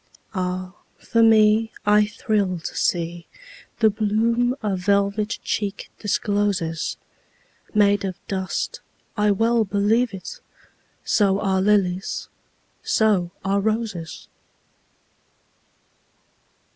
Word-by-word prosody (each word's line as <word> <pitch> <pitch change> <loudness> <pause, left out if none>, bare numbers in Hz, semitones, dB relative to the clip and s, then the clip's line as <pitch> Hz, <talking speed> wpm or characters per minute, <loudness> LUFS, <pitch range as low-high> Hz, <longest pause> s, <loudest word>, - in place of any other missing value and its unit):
Ah, 185 -1 -3 0.2
for 230 - 0
me, 220 0 +5
I 210 0 +4
thrill 205 -3 -1
to 165 - -6
seeThe 180 - -2
bloom 230 +4 +1
a 205 -2 0
velvet 200 +3 0
cheek 205 -1 -3
discloses, 200 -5 -1 0.8
Made 205 -1 +4
of 190 -2 -3
dust—I 200 +2 -3
well 225 +3 +2
believe 210 +4 +1
it! 340 - -8 0.7
So 200 -3 +2
are 190 -2 +1
lilies, 190 -2 0 0.5
so 205 -6 +2 0.2
are 195 +1 +2
roses! 215 -6 -3
205 Hz, 85 wpm, -23 LUFS, 190-220 Hz, 0.8 s, me